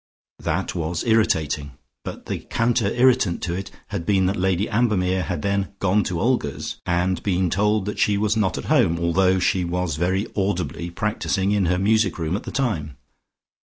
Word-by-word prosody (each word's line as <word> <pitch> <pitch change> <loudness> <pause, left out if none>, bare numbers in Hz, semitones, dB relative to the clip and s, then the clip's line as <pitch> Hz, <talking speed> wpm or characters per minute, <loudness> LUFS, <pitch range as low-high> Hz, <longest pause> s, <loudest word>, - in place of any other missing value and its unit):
That - - -2
was 85 0 -2
irritating, 80 - +1 0.3
but - - -7
the - - -3
counter 115 -2 0
irritant 120 -5 +2
to 85 - -1
it 95 +2 -4 0.2
had 100 -5 -3
been 95 +1 +2
that 95 +2 +1
Lady 95 +1 +1
Ambermere 95 -5 +1
had 85 -3 -3
then 100 0 -1
gone 100 +2 +2
to 90 -2 -2
Olga's, 115 - -1
and 90 +1 +1
been 90 -3 0
told 105 0 +1
that 105 - -4
she 100 -1 +3
was 105 +1 +1
not 105 -4 +1
at - - -5
home, 85 - +3 0.2
though 95 +1 +3
she 90 0 +1
was 85 -3 -2
very 95 +5 0
audibly 95 -3 -2
practising 100 +1 -1
in 100 -3 +2
her 90 +1 +2
music 105 0 +2
room 80 +1 -1
at 105 - -5
the - - -5
time. 80 - -2
95 Hz, 180 wpm, -23 LUFS, 85-105 Hz, 0.3 s, she